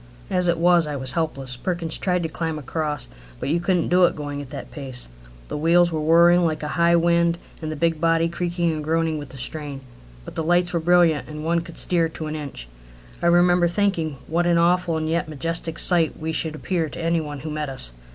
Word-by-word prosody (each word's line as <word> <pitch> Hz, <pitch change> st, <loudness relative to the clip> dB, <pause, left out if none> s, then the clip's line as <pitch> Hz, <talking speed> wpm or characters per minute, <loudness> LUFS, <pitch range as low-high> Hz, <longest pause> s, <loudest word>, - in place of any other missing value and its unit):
As 180 Hz, -1 st, +2 dB
it 170 Hz, -1 st, +2 dB
was, 170 Hz, -1 st, +4 dB
I 150 Hz, -, -3 dB
was 130 Hz, -1 st, -1 dB
helpless. 135 Hz, -5 st, -2 dB
Perkins 170 Hz, +2 st, -2 dB
tried 180 Hz, -2 st, 0 dB
to 165 Hz, -, -2 dB
climb 160 Hz, 0 st, -3 dB
across, 150 Hz, 0 st, -3 dB, 0.3 s
but -, -, -3 dB
you 165 Hz, +3 st, +2 dB
couldn't 175 Hz, -1 st, +1 dB
do 180 Hz, 0 st, +5 dB
it -, -, 0 dB
going 145 Hz, -1 st, -5 dB
at 140 Hz, -, -10 dB
that -, -, -8 dB
pace. 130 Hz, -4 st, -5 dB, 0.4 s
The -, -, -5 dB
wheels 170 Hz, +3 st, +4 dB
were 155 Hz, -1 st, -2 dB
whirring 170 Hz, +3 st, +5 dB
like 155 Hz, -2 st, -1 dB
a 150 Hz, -, -3 dB
high 170 Hz, +1 st, +3 dB
wind 170 Hz, 0 st, +3 dB, 0.2 s
and 155 Hz, -1 st, -4 dB
the -, -, -4 dB
big 165 Hz, 0 st, 0 dB
body 165 Hz, 0 st, +3 dB
creaking 170 Hz, 0 st, -1 dB
and 155 Hz, -1 st, -4 dB
groaning 160 Hz, 0 st, 0 dB
with 145 Hz, -, -8 dB
the 135 Hz, -, -10 dB
strain. 140 Hz, +1 st, -5 dB, 0.4 s
But -, -, -9 dB
the -, -, -2 dB
lights 175 Hz, +2 st, +2 dB
were 170 Hz, -, +1 dB
brilliant, 170 Hz, -2 st, +3 dB
and 150 Hz, 0 st, -6 dB
one 170 Hz, +1 st, +2 dB
could 170 Hz, 0 st, -9 dB
steer 170 Hz, -2 st, +2 dB
to 160 Hz, 0 st, -7 dB
an 155 Hz, 0 st, -4 dB
inch. 140 Hz, -, -7 dB, 0.5 s
I -, -, +2 dB
remember 175 Hz, 0 st, +4 dB
thinking 170 Hz, -5 st, 0 dB
what 170 Hz, +2 st, 0 dB
an 170 Hz, -1 st, +3 dB
awful 170 Hz, 0 st, +2 dB
and 155 Hz, 0 st, -2 dB
yet 165 Hz, 0 st, -1 dB
majestic 165 Hz, +2 st, -3 dB
sight 170 Hz, -4 st, +2 dB
we 160 Hz, 0 st, -3 dB
should 160 Hz, -1 st, -1 dB
appear 165 Hz, 0 st, -2 dB
to 170 Hz, -, -8 dB
any 165 Hz, 0 st, +1 dB
one 145 Hz, -2 st, -6 dB
who 155 Hz, -, -5 dB
met 150 Hz, -1 st, -3 dB
us. 125 Hz, -, -3 dB
165 Hz, 230 wpm, -23 LUFS, 155-170 Hz, 0.5 s, do